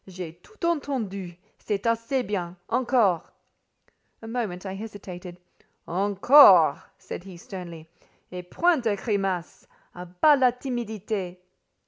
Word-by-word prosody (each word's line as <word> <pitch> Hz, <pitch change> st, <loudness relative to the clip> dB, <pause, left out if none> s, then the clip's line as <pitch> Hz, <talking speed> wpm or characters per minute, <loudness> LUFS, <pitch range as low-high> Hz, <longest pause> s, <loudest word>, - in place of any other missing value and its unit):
"J'ai 180 Hz, -3 st, -8 dB
tout 365 Hz, -, -9 dB
entendu. 220 Hz, -, -3 dB, 0.2 s
C'est 205 Hz, -1 st, -3 dB
assez 230 Hz, +3 st, 0 dB
bien. 180 Hz, -4 st, -4 dB
Encore!" 235 Hz, -, +1 dB, 0.9 s
A -, -, -8 dB
moment 220 Hz, -6 st, -4 dB
I 190 Hz, -, -4 dB
hesitated. 190 Hz, -4 st, -9 dB, 0.5 s
"Encore!" 195 Hz, -, +6 dB, 0.2 s
said -, -, -8 dB
he 190 Hz, -2 st, -11 dB
sternly. 170 Hz, -3 st, -9 dB, 0.4 s
"Et 180 Hz, 0 st, -6 dB
point 335 Hz, -, +1 dB
de 220 Hz, -3 st, +1 dB
grimaces! 195 Hz, -4 st, -3 dB, 0.3 s
A 180 Hz, 0 st, -9 dB
bas 280 Hz, -, +4 dB
la 255 Hz, -1 st, +5 dB
timidité!" 220 Hz, -7 st, -4 dB
195 Hz, 115 wpm, -25 LUFS, 180-235 Hz, 0.9 s, Encore